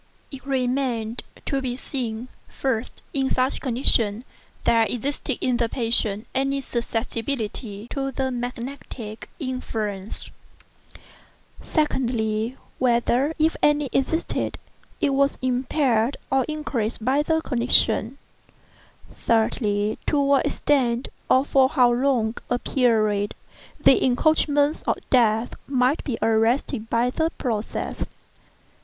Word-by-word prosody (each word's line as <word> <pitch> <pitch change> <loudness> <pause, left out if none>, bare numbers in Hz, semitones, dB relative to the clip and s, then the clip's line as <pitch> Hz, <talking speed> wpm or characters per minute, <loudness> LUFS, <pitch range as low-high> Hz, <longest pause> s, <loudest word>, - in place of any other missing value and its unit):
It 275 -2 -9
remained 250 -3 0 0.2
to 275 -1 -1
be 250 -2 -3
seen, 245 -3 -4 0.2
first, 255 -3 -3
whether, 270 -1 +1
in - - -1
such 255 +1 +1
condition, 235 -3 +1 0.4
there 230 -1 +4
existed 270 +3 -2
in 250 -2 +1
the 235 -1 +1
patient 225 -3 0
any 275 +1 +1
susceptibility 230 -3 -3
to 270 -1 -2
the 265 0 -1
magnetic 245 -2 -6
influence; 220 - -4 1.4
secondly, 235 -6 0 0.2
whether, 250 +4 +2
if 315 +1 +2
any 295 -2 +3
existed, 320 +5 0 0.4
it 285 - +2
was 280 +1 +2
impaired 255 -1 +1
or 265 -1 +3
increased 245 -8 -3
by 270 +3 +3
the 320 +2 +1
condition; 240 -3 +2 1.0
thirdly, 215 -2 +1
to 295 - +2
what 280 -1 +3
extent, 250 -4 +1 0.2
or 260 +2 +5
for 265 -2 +4
how 250 -5 +4
long 240 -3 +1 0.2
a 245 - +2
period, 215 -6 +1 0.4
the 265 - +5
encroachments 290 +3 +2
of - - +2
Death 230 -2 +3
might 260 +2 +2
be 250 -6 -2
arrested 225 +1 +1
by 235 +2 +2
the 320 +4 +1
process. 225 -4 -3
250 Hz, 110 wpm, -24 LUFS, 225-275 Hz, 1.4 s, or